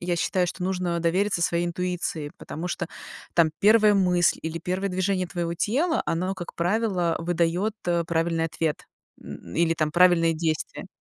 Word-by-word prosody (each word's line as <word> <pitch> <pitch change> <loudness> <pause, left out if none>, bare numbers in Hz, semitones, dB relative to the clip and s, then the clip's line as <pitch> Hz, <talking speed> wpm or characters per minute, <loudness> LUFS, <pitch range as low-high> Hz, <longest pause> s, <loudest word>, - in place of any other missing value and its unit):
я 175 0 -1
считаю, 180 +2 +1
что 180 +1 -5
нужно 180 -2 -1
довериться 175 +2 +1
своей 170 +1 +1
интуиции, 170 -3 -3
потому 170 +4 -6
что 175 - -3 0.5
там 165 -2 +4
первая 215 0 +6
мысль 180 -3 +3
или 160 +1 -4
первое 185 +4 -2
движение 185 0 0
твоего 170 -1 -3
тела 290 - +1
оно, 185 +3 -1
как 175 -2 -8
правило, 180 -2 0
выдает, 175 +5 0
э, 170 -1 +1
правильный 165 0 0
ответ, 160 -1 -2 0.4
м, - - -10
м, - - -9
или 165 -1 +2
там 155 -1 0
правильные 175 -2 +5
действия. 155 -1 -3
175 Hz, 165 wpm, -25 LUFS, 165-185 Hz, 0.5 s, первая